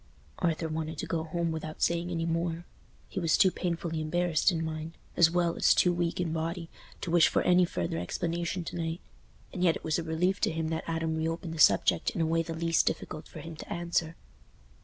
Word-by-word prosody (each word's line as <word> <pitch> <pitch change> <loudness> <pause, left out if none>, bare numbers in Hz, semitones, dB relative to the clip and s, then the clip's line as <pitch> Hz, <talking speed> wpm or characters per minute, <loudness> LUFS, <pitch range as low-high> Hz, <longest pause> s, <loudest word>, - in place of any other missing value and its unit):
Arthur 165 -2 0
wanted 160 0 -4
to - - -3
go 160 -1 -2
home 170 +1 -1
without 155 -1 -4
saying 170 +1 +1
any 165 -2 -1
more—he 170 +2 -4
was 165 -3 +3
too 190 - +5
painfully 170 -3 -2
embarrassed 175 +2 +2
in 165 -2 -1
mind, 160 +1 -5 0.2
as 170 -2 +6
well 170 0 +1
as - - +4
too 180 - +4
weak 170 0 -1
in 170 -3 -1
body, 165 +1 -3 0.3
to 170 - -3
wish 170 -2 +6
for - - +1
any 180 0 +5
further 85 - -2
explanation 170 - -2
to 170 - -6
night. 165 0 -3 0.5
And 180 - -2
yet 170 -3 +4
it - - -7
was 160 +1 0
a - - -3
relief 175 +5 0
to - - +2
him 160 0 -2
that 160 0 -3
Adam 160 -1 -1
reopened 165 +1 -2
the 165 - -7
subject 160 - +4
in - - -5
a 165 - +3
way 165 +1 +2
the 165 0 -5
least 165 0 +2
difficult 155 - -3
for 155 - -10
him 165 +1 -8
to - - -10
answer. 170 -1 -1
165 Hz, 215 wpm, -29 LUFS, 160-170 Hz, 0.5 s, as